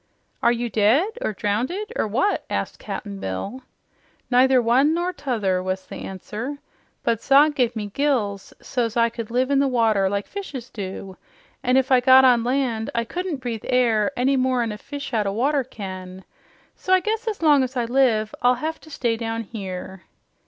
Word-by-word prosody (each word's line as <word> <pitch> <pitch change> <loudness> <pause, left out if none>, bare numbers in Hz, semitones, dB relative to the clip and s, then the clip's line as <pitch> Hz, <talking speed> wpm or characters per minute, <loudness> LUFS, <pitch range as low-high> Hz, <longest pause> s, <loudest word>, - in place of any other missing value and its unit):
"Are 235 - +4
you 240 0 -1
dead, 235 - +3
or - - 0
drownded, 250 - -2
or - - 0
what?" 270 - 0
asked - - -3
Cap'n 200 -2 -6
Bill. 145 - -5 0.7
"Neither 255 +1 +5
one 260 +7 +3
nor 350 +2 -1
t'other," 225 - -1
was 185 0 -3
the - - -9
answer. 215 +8 -6 0.5
"But 230 -1 0
Zog 285 +4 +5
gave 245 -4 0
me 215 -2 -3
gills 230 -9 -1
so's 240 -3 -2
I 230 0 +4
could 230 -1 -7
live 255 +3 0
in 275 - +4
the 280 - +3
water 220 -6 +2
like 200 +1 -2
fishes 280 - -7
do, 190 -2 -7 0.4
an' 255 0 +2
if 265 0 +1
I 255 - +7
got 260 +1 +7
on 245 -2 +5
land 245 -3 -1
I 235 - +1
couldn't 350 +2 -4
breathe 235 -4 -4
air 240 -2 +2
any 260 +3 +2
more'n 255 -3 +1
a 210 - -7
fish 280 -1 -7
out 215 -3 +1
o' 195 - -1
water 275 +5 +1
can. 190 -5 -8 0.5
So 375 - -1
I - - +4
guess 440 +4 -2
as 420 -6 -3
long 295 -3 +6
as 255 0 -4
I 240 - +1
live, 230 -4 +2
I'll 250 +1 +4
hev 315 +6 -4
to 315 - -15
stay 235 -6 -1
down 225 0 -3
here." 190 -3 -7
245 Hz, 190 wpm, -23 LUFS, 215-275 Hz, 0.7 s, I